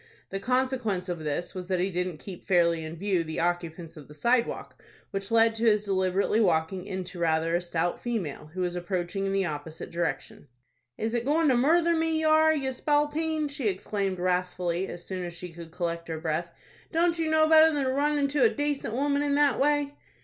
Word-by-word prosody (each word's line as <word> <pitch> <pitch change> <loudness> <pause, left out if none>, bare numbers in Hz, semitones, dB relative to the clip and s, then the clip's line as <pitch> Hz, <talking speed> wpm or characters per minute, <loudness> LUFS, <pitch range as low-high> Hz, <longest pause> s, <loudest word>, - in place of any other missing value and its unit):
The 195 - -3
consequence 245 -6 -1
of 175 -2 -3
this 155 +2 -3
was 185 -1 -6
that 185 -1 0
he 190 +2 0
didn't 180 -2 -2
keep 180 +3 -10
fairly 170 -3 +3
in 160 +1 -6
view 185 -1 0
the 160 -1 -5
occupants 170 -1 -2
of 150 -3 -12
the 150 - -13
sidewalk, 235 +10 0 0.3
which 195 0 -4
led 225 0 +4
to 225 +1 0
his 210 -1 +3
deliberately 190 +2 +1
walking 180 0 +1
into 185 -2 -5
rather 165 0 +1
a 175 - +1
stout 175 0 -2
female, 185 - -3
who 185 - -2
was 180 -1 -1
approaching 180 +2 -2
in - - -1
the 195 -1 +1
opposite 155 0 -6
direction. 160 -4 -3 0.5
"Is 225 +1 -2
it 240 -1 0
goin' 300 +3 +2
to 255 - +4
murther 335 +7 +3
me 325 0 +1
ye 315 - -1
are, 315 0 +5
you 275 -4 -1
spalpeen?" 300 +3 0
she 285 -5 -3
exclaimed, 195 0 -2
wrathfully, 180 0 -1
as 175 - -8
soon 185 -1 -4
as 175 -1 -6
she 180 +1 -7
could 170 -1 -10
collect 170 0 -3
her 160 -1 -4
breath. 160 +1 -2 0.4
"Don't 335 0 +2
you 320 -1 0
know 315 0 +4
better 320 0 +7
than 290 -2 0
to 260 - 0
run 295 +2 +1
into 285 0 +1
a - - +6
dacent 290 -6 -2
woman 285 +2 +1
in 285 -1 +1
that 290 -2 +3
way?" 290 0 +2
195 Hz, 210 wpm, -27 LUFS, 175-280 Hz, 0.5 s, better